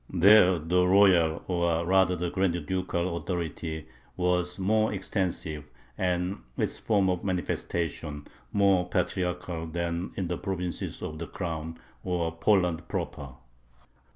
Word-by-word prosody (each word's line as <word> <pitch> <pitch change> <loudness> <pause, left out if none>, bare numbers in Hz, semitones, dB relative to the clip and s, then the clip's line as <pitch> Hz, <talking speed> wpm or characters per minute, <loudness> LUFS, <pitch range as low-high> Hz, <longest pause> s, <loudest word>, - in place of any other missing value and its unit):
There 95 0 +6
the 90 +3 +2
royal, 90 -4 +5
or 85 -2 +1
rather 95 0 +4
the 90 0 -2
grand 85 -4 0
ducal, 90 -1 -1
authority 80 -3 -4 0.3
was 90 0 0
more 110 +3 +2
extensive 90 -6 -3 0.3
and 90 +1 -1 0.2
its - - -1
form 100 -4 +2
of 90 -1 0
manifestation 85 -5 -3 0.3
more 95 -3 +3
patriarchal 90 -2 -2
than 85 +2 -3
in 95 - -2
the 90 0 -3
provinces 90 -3 -4
of 80 0 -5
the 85 - -5
Crown, 80 -2 -5 0.3
or 85 -2 -1
Poland 90 -2 +2
proper. 70 -2 -4
90 Hz, 125 wpm, -28 LUFS, 85-95 Hz, 0.3 s, There